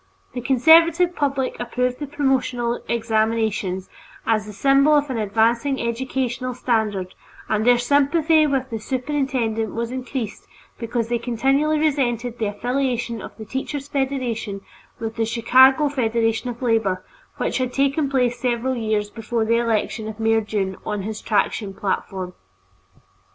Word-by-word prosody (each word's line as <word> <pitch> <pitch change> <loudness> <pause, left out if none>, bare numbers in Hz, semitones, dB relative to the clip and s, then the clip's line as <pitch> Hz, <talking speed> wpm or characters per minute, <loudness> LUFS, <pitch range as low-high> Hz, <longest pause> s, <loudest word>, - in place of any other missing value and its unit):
The 245 - -4
conservative 330 +7 +5
public 275 -3 -1
approved 250 +1 -1
the 290 - -4
promotional 255 -4 0
examinations 220 -4 0 0.4
as 215 -2 +1
the - - -7
symbol 275 +7 +4
of 290 -1 +1
an 240 - -2
advancing 230 +6 +1
educational 250 +1 -2
standard, 215 -7 -1 0.3
and 215 +2 0
their 245 0 +6
sympathy 295 +5 +3
with 265 -2 -1
the 225 - -3
superintendent 250 -4 -2
was 230 +1 -2
increased 255 -3 -5 0.3
because 230 0 -2
they 240 -1 0
continually 270 +6 +1
resented 250 -6 0
the 220 - 0
affiliation 245 +2 -2
of - - -10
the 220 - -8
Teachers' 270 +4 -4
Federation 255 -7 -2 0.4
with 225 0 -5
the 225 - +1
Chicago 260 +5 +5
Federation 230 -3 0
of 240 +1 -7
Labor, 220 -6 +1 0.3
which - - -1
had 255 -1 -1
taken 275 +2 +1
place 250 -3 +1
several 245 +1 0
years 215 -3 -1
before 225 0 -2
the 230 +1 +2
election 225 -1 -1
of 220 0 -7
Mayor 225 0 +3
Dunne 200 -3 -2
on 205 -2 -3
his 215 +1 -5
traction 205 -1 0
platform. 190 -2 -3
240 Hz, 140 wpm, -22 LUFS, 220-270 Hz, 0.4 s, their